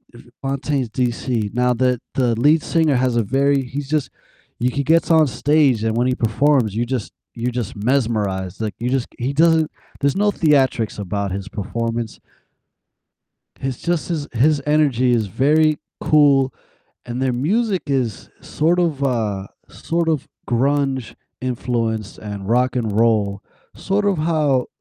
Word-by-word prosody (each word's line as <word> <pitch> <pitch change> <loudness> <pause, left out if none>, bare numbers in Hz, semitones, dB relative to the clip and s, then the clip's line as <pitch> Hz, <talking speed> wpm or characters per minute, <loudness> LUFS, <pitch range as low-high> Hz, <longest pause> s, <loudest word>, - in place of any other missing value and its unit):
F 120 - -12 0.2
Fontaines 135 -2 -2
DC. 120 -2 -2
Now, 125 0 +2
the 125 0 +1 0.2
the 120 -3 +2
lead 150 +4 +4
singer 160 -4 +2
has 125 -1 +1
a 115 - +3
very 135 +4 +1
he's 140 +3 -5
just 150 -5 0 0.5
you 125 - +1
he 140 - -1
gets 165 +4 +2
on 160 -2 +5
stage, 140 -4 +2
and 110 0 0
when 120 +1 +2
he 130 - +1
performs, 120 -1 +2
you 120 +2 0
just 125 -4 -3 0.2
you're 120 +1 -2
just 120 -4 -4
mesmerized, 105 -6 -1
like, 110 -2 -2
you 120 +2 -1
just 130 -1 0
he 125 +3 -1
doesn't 160 +1 +3 0.3
there's 140 -1 +2
no 205 +1 +2
theatrics 135 - +1
about 100 0 -3
his 100 +1 -4
performance. 115 +2 -4 1.4
He's 130 -2 -3
just 175 -1 -1
this 155 -4 -2
His 140 +5 +3
energy 140 -5 +2
is 115 -4 +1
very 150 +7 +2 0.2
cool, 145 -4 +4 0.5
and 125 +1 -4
their 130 -1 +1
music 190 - 0
is 125 - -2
sort 170 +4 +1
of, 160 -6 0
uh 110 -7 -1 0.2
sort 170 0 -2
of 155 -4 -1 0.2
grunge 135 0 0 0.3
influenced, 115 -4 -2
and 100 -2 -7
rock 125 +2 +2
and 110 -4 -1
roll, 105 -3 +2 0.3
sort 200 +1 -1
of 200 -3 +2
how, 150 -5 +1
130 Hz, 155 wpm, -20 LUFS, 115-150 Hz, 1.4 s, on